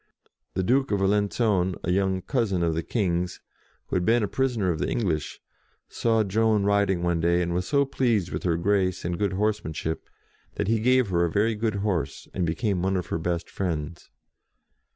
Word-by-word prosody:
The 95 - 0
Duke 135 +7 +2
of 100 - +1
Alenc.on, 100 -1 +1
a 90 - 0
young 95 0 +1
cousin 105 -10 0
of 85 -1 +1
the 80 - -1
King's, 90 -3 -1 0.5
who - - -4
had 90 - 0
been 115 +3 +3
a - - +1
prisoner 120 -7 0
of 80 - -3
the - - -1
English, 85 - -2 0.5
saw 115 -2 +1
Joan 110 +1 +2
riding 100 -3 +2
one 85 -1 +1
day, 85 +1 +2
and 85 -1 -1
was 90 +1 -1
so 140 -1 +3
pleased 115 -9 0
with - - -3
her 85 -3 +1
grace 95 0 0
and 85 +1 -2
good 100 -2 0
horse 105 +2 0
manship, 80 +1 -4 0.5
that - - -2
he 115 +1 +2
gave 125 0 +3
her 85 -2 +2
a 85 - +1
very 110 +4 +2
good 110 0 -1
horse, 80 -9 -2
and 90 -3 -1
became 95 +2 -1
one 95 +1 +1
of 90 - -2
her - - 0
best 85 +1 -2
friends. 85 -3 -4
95 Hz, 195 wpm, -26 LUFS, 85-110 Hz, 0.5 s, been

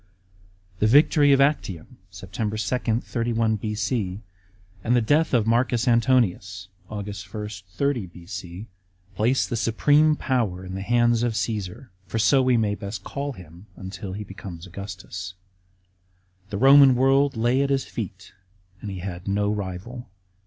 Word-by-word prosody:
The 105 - +3
victory 145 +3 +5
of 135 - +5
Actium 135 - 0
(Sept. 90 0 -11 0.6
2, 115 +2 +2
31 115 -2 0
B.C.), 105 -2 -2 0.6
and 120 - +2
the - - +5
death 145 +8 +2
of 115 -5 +2
Marcus 120 +1 +1
Antonius 110 -7 +1 0.2
(Aug. 100 -2 -6
1, 105 -1 -5 0.3
30 140 -7 0
B.C.) 90 +2 -9 0.5
placed 120 +7 +1
the - - 0
supreme 145 +7 +3
power 110 -11 -1
in 95 - -7
the 95 - -4
hands 120 +2 +2
of 120 -2 0
C«esar, 105 +3 -3 0.2
for 90 - -3
so 135 +5 +4
we 130 -2 +3
may 105 -2 +1
best 100 -1 -6
call 140 0 -4
him 90 -1 -14
until 95 0 -7
he 105 +2 -5
becomes 95 -3 -9
Augustus. 95 0 -8 1.1
The 100 - -3
Eoman 135 +2 +7
world 135 +1 +3
lay 120 +4 +2
at 140 - 0
his 135 -1 +1
feet 95 -4 -7 0.5
and 105 - -6
he 95 -2 -6
had 90 -1 -6
no 100 +1 +1
rival. 105 +4 -6
110 Hz, 145 wpm, -24 LUFS, 95-125 Hz, 1.1 s, Eoman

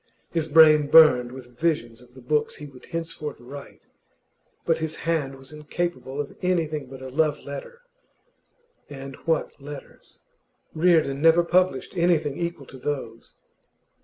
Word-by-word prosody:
His 165 -2 -1
brain 155 -1 +6
burned 130 -7 +7
with 125 -2 -12
visions 120 -8 -1
of 125 0 -20
the 130 - -13
books 150 +3 0
he 150 - -9
would 135 -3 -14
henceforth 165 -3 -5
write, 140 +4 -11 0.8
but 165 -1 +2
his 160 0 -3
hand 155 -5 -2
was 135 +1 -14
incapable 150 -2 -4
of 145 - -4
anything 160 -6 -1
but 130 0 -10
a 130 - -6
love 150 +2 0
letter. 140 - -8 1.1
And 135 -1 -8
what 160 -3 -1
letters! 145 0 -11 0.5
Reardon 160 -4 +2
never 165 +2 +6
published 180 +2 +1
anything 170 -5 +2
equal 170 -4 -4
to 130 0 -13
those. 125 -5 -5
150 Hz, 140 wpm, -25 LUFS, 135-165 Hz, 1.1 s, burned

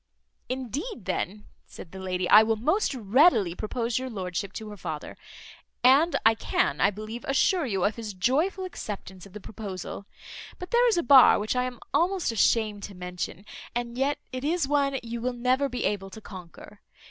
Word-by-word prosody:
"Indeed, 260 - -5
then," 210 +3 -3 0.2
said 165 - -12
the 190 - -9
lady, 185 -1 -2
"I 210 - +9
will 220 0 +1
most 310 - 0
readily 225 - +4
propose 230 +4 -2
your 260 0 -5
lordship 190 -2 -4
to 215 -1 -7
her 210 - -8
father; 160 -6 -6 0.7
and 280 +7 +5
I 225 - +7
can, 150 -8 -1
I 195 - +5
believe, 215 +3 -7
assure 290 +4 +2
you 195 -5 -1
of 210 - 0
his 215 -4 -6
joyful 305 - 0
acceptance 200 - -7
of 190 - -19
the 210 - -7
proposal; 200 -2 -7 0.5
but 360 - -9
there 485 +1 +4
is 455 - +2
a 345 - +1
bar, 265 +1 +8
which 215 +4 -2
I 250 0 +1
am 250 -2 -6
almost 360 -5 +1
ashamed 215 -1 +1
to 200 - -10
mention; 180 +1 -6 0.3
and 240 0 -3
yet 275 +3 0
it 255 0 -5
is 320 0 0
one 280 -1 +1
you 235 0 -5
will 250 +1 -1
never 255 +3 +1
be 250 - -4
able 195 -2 -2
to 205 - -10
conquer. 185 -5 -12
230 Hz, 185 wpm, -27 LUFS, 200-270 Hz, 0.7 s, I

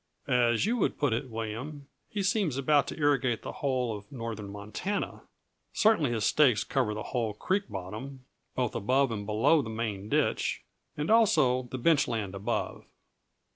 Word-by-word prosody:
As 120 0 +3
you 235 +3 +1
would 215 - 0
put 145 -5 +1
it, 125 +3 -2
William, 115 +6 -5 0.2
he 205 -2 -2
seems 190 - +1
about 145 +1 +3
to - - -6
irrigate 135 -6 +1
the - - -5
whole 125 -5 -1
of 105 0 -11
northern 115 -5 -5
Montana; 105 - -4 0.5
certainly 215 - +3
his 115 -3 0
stakes 130 -8 +4
cover 125 -6 0
the 105 - -4
whole 115 -4 -1
creek 190 - -1
bottom, 110 +8 -7 0.3
both 125 -3 0
above 130 +4 +2
and 105 -2 -4
below 125 +9 +4
the 115 - -6
main 110 -3 -4
ditch, - - 0 0.3
and 150 +6 -1
also 150 - +4
the 130 - -4
bench 145 +3 +3
land 105 -5 -3
above." 100 +4 -3
125 Hz, 165 wpm, -29 LUFS, 110-145 Hz, 0.5 s, stakes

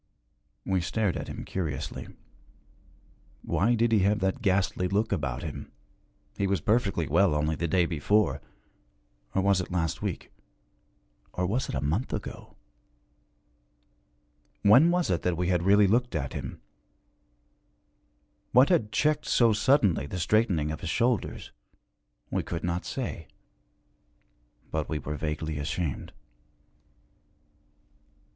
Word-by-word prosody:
We 95 -2 +1
stared 100 +2 -1
at - - -5
him - - -7
curiously. 75 -5 -4 1.4
Why 115 +5 +2
did 115 0 +2
he 110 - +4
have 100 +2 +3
that 95 +6 -1
ghastly 95 -3 +1
look 105 +4 0
about 70 -6 -2
him? 80 -3 -7 0.6
He 100 - 0
was 95 -2 +1
perfectly 100 -3 +1
well 85 +1 +3
only 75 +1 +1
the 85 - -2
day 85 +2 +2
before 90 +6 +1 0.9
or 95 - +2
was 100 -2 +3
it 90 - -7
last 85 -3 -1
week - - -4 1.0
or 90 - -1
was 120 +8 -1
it - - -3
a 65 - -1
month 80 - -1
ago? - - -7 2.1
When 125 +11 +7
was 175 - +1
it 85 - 0
that 90 -2 -1
we 90 0 0
had 90 -2 +2
really 100 +3 +5
looked 120 +1 +1
at 65 -4 -2
him? - - -6 1.9
What 125 +3 +6
had 115 - +2
checked 150 +6 +1
so 115 -2 +4
suddenly 105 - +2
the 90 - -5
straightening 90 -5 +1
of 80 - -6
his 90 - -4
shoulders? 120 +6 -1 0.8
We - - 0
could 85 - -5
not 85 0 -2
say. 120 - -5 1.4
But 80 -1 -2
we 80 - -1
were 75 +1 -5
vaguely 75 0 -3
ashamed. 75 0 -3
95 Hz, 130 wpm, -28 LUFS, 80-110 Hz, 2.1 s, When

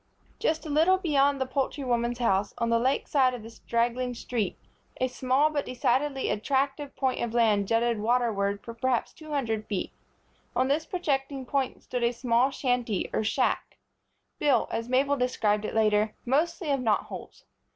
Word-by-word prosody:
Just 315 +1 0
a - - -5
little 325 +6 +4
beyond 285 -6 +2
the 265 - 0
poultry 270 +2 -2
woman's 240 -1 0
house, 200 -4 +1
on 235 0 0
the 230 - +4
lake 260 +4 +1
side 260 -3 +3
of 235 - -9
the 225 - -10
straggling 240 +2 -1
street, 230 -5 -2 0.4
a 255 - +2
small, 260 +4 +1
but 290 -2 -1
decidedly 265 +2 0
attractive 275 +5 -1
point 260 -1 0
of 235 0 -3
land 210 -4 +3
jutted 230 0 +1
waterward 210 -3 0
for 230 - -7
perhaps 245 +1 -1
two 310 -1 -13
hundred 225 -7 -2
feet. 200 -3 -3 0.6
On 255 - +2
this 305 +3 0
projecting 275 -6 -2
point 270 0 -2
stood 250 - -3
a 235 +1 +2
small 240 +1 +2
shanty 245 -6 -1
or - - +1
shack, 215 - 0 0.6
built, 285 -4 +2
as 230 +1 -3
Mabel 275 +3 +2
described 220 -4 +1
it - - -4
later, 215 -1 +2
mostly 315 +5 0
of 275 - +1
knot 220 -4 +2
holes. - - -10
250 Hz, 170 wpm, -27 LUFS, 230-275 Hz, 0.6 s, little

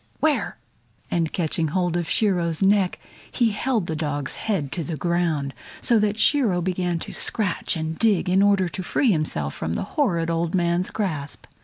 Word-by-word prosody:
Where?" 310 -2 0 0.5
And 165 -2 0
catching 165 -1 0
hold 175 +2 0
of 175 -2 -2
Shiro's 175 -5 +1
neck 195 -2 +3 0.3
he 235 -3 +2
held 220 -1 -1
the 160 - -3
dog's 145 -3 -2
head 180 -11 -2
to 170 - -3
the 160 0 -4
ground, 165 -5 -1 0.3
so 235 -3 +4
that 210 0 0
Shiro 225 -7 +4
began 180 -1 -1
to - - -7
scratch 200 -6 0
and 160 0 -4
dig 215 -6 +2
in 185 +2 +3
order 200 -2 +3
to 180 - -5
free 235 +7 +2
himself 115 - -1
from 80 - -4
the - - -2
horrid 170 - +1
old 165 +1 -1
man's 175 0 +1
grasp. 155 -9 -3
175 Hz, 175 wpm, -23 LUFS, 160-205 Hz, 0.5 s, so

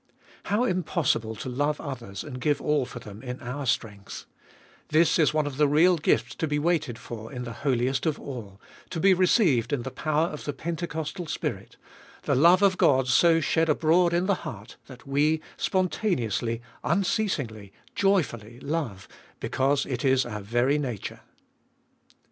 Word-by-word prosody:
2. - - -39 0.3
How 210 +4 +2
impossible 165 - 0
to 110 - -7
love 145 +4 -1
others 115 -8 -6
and 130 -4 -8
give 145 -1 +1
all 150 -3 +1
for 125 - -9
them 105 -3 -10
in 125 -1 -6
our 130 +3 -5
strength 105 -4 -3
I - - -33 0.5
This 160 +1 +4
is 155 - +4
one 155 -1 +1
of 140 -2 -5
the 150 0 +4
real 165 +6 +5
gifts 155 - +1
to 160 - -1
be 150 0 0
waited 155 -6 0
for 115 -2 -8
in 125 -2 -5
the 120 -1 -6
Holiest 130 +1 +1
of 155 - -1
all, 105 -8 -8 0.3
to 165 - -4
be 195 +3 +5
received 175 - +3
in 135 -4 -1
the 130 - -5
power 155 +4 0
of 150 - -8
the 145 - -2
pentecostal 165 +1 -4
Spirit— 150 - -4 0.5
the - - +1
love 170 +8 +5
of 190 -2 +3
Qod 130 -2 +4
so 165 +6 +5
shed 160 +2 +1
abroad 165 +3 +3
in 175 +2 +1
the 200 - +3
heart, - - -8
that 130 -3 -13
we 145 +3 +2 0.2
spontaneously, 125 - -1 0.2
unceasingly, 145 - -1 0.2
joyfully 120 - 0
love, 135 - -3 0.3
becausx 140 +1 +1
It 125 -3 -3
Is 130 -1 +3
our 105 -3 -5
very 120 +8 +1
nature. 125 -8 -4
145 Hz, 170 wpm, -26 LUFS, 120-165 Hz, 0.5 s, real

